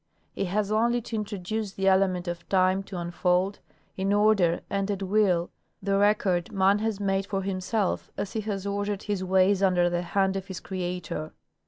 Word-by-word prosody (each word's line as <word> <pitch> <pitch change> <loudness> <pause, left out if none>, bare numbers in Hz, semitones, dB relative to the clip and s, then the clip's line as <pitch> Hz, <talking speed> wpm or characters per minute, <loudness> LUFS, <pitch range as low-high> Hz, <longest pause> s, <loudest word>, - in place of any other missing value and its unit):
He - - -2
has 205 +3 -1
only 235 +3 +2
to 235 0 -6
introduce 210 0 -3
the 195 0 -1
element 190 -2 +3
of 170 0 -5
time 185 0 +3
to 195 - -7
unfold, 180 +3 0 0.4
in 190 +1 -1
order 205 -5 +3
and 195 0 -1
at 200 -1 -2
will, 190 -3 +2 0.3
the 195 0 0
record 195 -3 +2
man 195 0 +3
has 220 -2 -1
made 195 -1 0
for 195 -1 -2
himself 195 +1 -1
as 200 - -4
he 220 - -1
has 200 -2 -4
ordered 200 0 -2
his 205 -3 -2
ways 190 +1 +3
under 180 -2 +3
the 175 0 0
hand 190 +2 0
of 195 0 -4
his 190 -3 -6
Creator. 180 -4 -4
195 Hz, 180 wpm, -27 LUFS, 185-205 Hz, 0.4 s, element